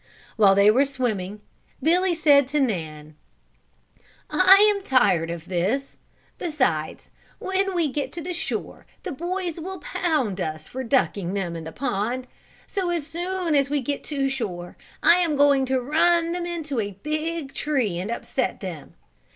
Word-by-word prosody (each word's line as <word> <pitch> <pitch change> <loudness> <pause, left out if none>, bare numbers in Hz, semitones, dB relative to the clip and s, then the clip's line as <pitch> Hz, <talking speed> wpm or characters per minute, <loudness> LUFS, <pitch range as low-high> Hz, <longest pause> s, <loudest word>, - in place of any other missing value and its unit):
While 200 -3 +5
they 200 +1 +6
were 260 +5 +4
swimming, 215 -8 -3 0.4
Billy 350 +2 +3
said 290 -4 +5
to 295 +2 0
Nan: 155 - -2 1.2
"I 370 +1 +7 0.2
am 400 - -5
tired 195 - +2
of 170 -1 -6
this, 195 +10 -1 0.4
beside 255 - -1 0.3
when 385 0 -1
we 335 -3 +2
get 285 +1 -3
to 345 +1 -5
shore 345 - -5 0.2
the - - -4
boys 345 +3 -3
will 375 +3 -6
pound 305 - -1
us 155 -2 -4
for 260 +1 -5
ducking 205 -7 0
them 175 -4 -2
in 165 -1 -6
the 160 - -6
pond, 245 +2 -2 0.4
so 380 -3 -2
as 340 -4 -1
soon 350 +1 -2
as 280 -1 +3
we 290 0 +1
get 280 +2 -3
to 275 -2 -1
shore 200 -10 -4 0.3
I 345 - +7
am 340 -4 +1
going 280 -2 +4
to 260 0 +1
run 330 +5 +2
them 350 0 -3
into 310 -7 -3
a 200 -3 -4
big 310 -1 -3
tree 250 - -1
and 190 +4 -4
upset 245 +2 -2
them. 175 -7 -8
275 Hz, 160 wpm, -24 LUFS, 200-335 Hz, 1.2 s, I